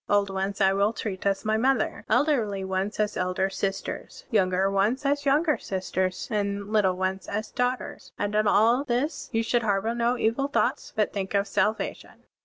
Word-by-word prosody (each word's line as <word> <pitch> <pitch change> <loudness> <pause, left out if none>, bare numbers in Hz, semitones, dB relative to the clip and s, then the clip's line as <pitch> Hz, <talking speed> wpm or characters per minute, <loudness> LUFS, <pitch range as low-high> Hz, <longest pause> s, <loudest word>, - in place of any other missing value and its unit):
Old 200 -1 +2
ones 195 +1 -2
I 195 -1 +4
will 200 +3 +2
treat 200 -3 -4
as 195 +1 0
my 215 0 +2
mother; 255 0 +1
elderly 230 -6 +2
ones 190 +2 -2
as 210 -1 0
elder 185 +1 0
sisters; 195 0 -4
yotmger 190 -1 +2
ones 210 +8 +1
as 285 0 +1
younger 300 +2 +3
sisters; 185 -1 -2
and 200 0 -2
little 195 -4 +3
ones 190 0 -2
as 215 +1 -3
daughters.' 250 +1 -2
And 205 0 -2
in 215 0 +2
all 230 +6 +4
this 280 +4 -2
you 225 -1 +1
shotdd 240 +1 +1
harbor 215 +1 0
no 240 +1 +1
evil 240 +6 +1
thoughts, 285 - 0
but 215 -2 +1
think 195 0 -3
of 200 +1 +2
salvation.' 210 +2 -2
210 Hz, 180 wpm, -26 LUFS, 195-235 Hz, -, I